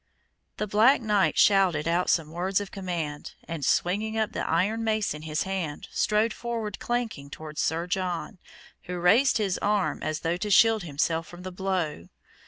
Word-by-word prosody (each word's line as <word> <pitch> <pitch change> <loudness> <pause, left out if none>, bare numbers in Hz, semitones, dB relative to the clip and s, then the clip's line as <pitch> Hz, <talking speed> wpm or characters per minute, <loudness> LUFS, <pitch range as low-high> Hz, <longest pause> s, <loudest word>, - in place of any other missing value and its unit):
The 210 - -1
black 220 +7 +4
knight 210 -4 +1
shouted 185 -7 +4
out 175 +2 +1
some 155 -2 +1
words 185 +3 0
of 205 -1 -6
command, 170 -6 -5
and 165 -3 -5
swinging 210 +10 +1
up 220 -1 0
the - - -3
iron 205 +7 +1
mace 215 -5 0
in 150 - -8
his 155 0 -2
hand, 185 -6 -4
strode 215 +1 +1
forward 230 -4 -4
clanking 235 -13 -3
towards 155 +1 -6
Sir 165 +2 0
John, 180 +1 -3 0.5
who 180 0 -4
raised 215 +11 +4
his 200 -4 -1
arm 205 -1 0
as 155 0 -3
though 165 +2 -1
to 210 +3 -3
shield 225 +2 +5
himself 165 +1 -1
from 175 +1 -11
the 185 - -6
blow. 180 - -2
185 Hz, 175 wpm, -27 LUFS, 165-210 Hz, 0.5 s, shield